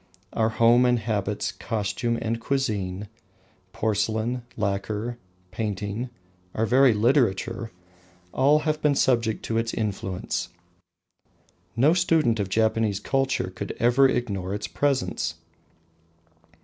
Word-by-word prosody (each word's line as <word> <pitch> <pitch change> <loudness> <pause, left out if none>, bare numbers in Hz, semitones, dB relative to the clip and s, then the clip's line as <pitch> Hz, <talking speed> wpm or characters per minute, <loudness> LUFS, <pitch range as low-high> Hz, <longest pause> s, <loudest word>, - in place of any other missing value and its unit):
Our 110 0 +2
home 115 +2 +4
and 125 0 +3
habits, 105 -2 -2
costume 115 +2 -2
and 115 0 -2
cuisine, 105 -8 -2 0.6
porcelain, 110 +3 -1 0.2
lacquer, 105 +3 -2 0.3
painting 105 +2 -3 0.5
our 110 - +1
very 130 +3 +5
literature 115 -1 +1 0.6
all 145 +3 +4
have 155 0 -1
been 145 -2 +3
subject 115 -5 +1
to 115 0 0
its 115 0 -2
influence. 95 -4 -3 1.3
No 140 +8 +4
student 160 -10 +2
of 100 -2 -1
Japanese 110 -1 +1
culture 135 -5 0
could 100 +2 -5
ever 125 +3 +4
ignore 100 -7 -2
its 105 - -4
presence. 130 - -1
115 Hz, 110 wpm, -25 LUFS, 105-125 Hz, 1.3 s, very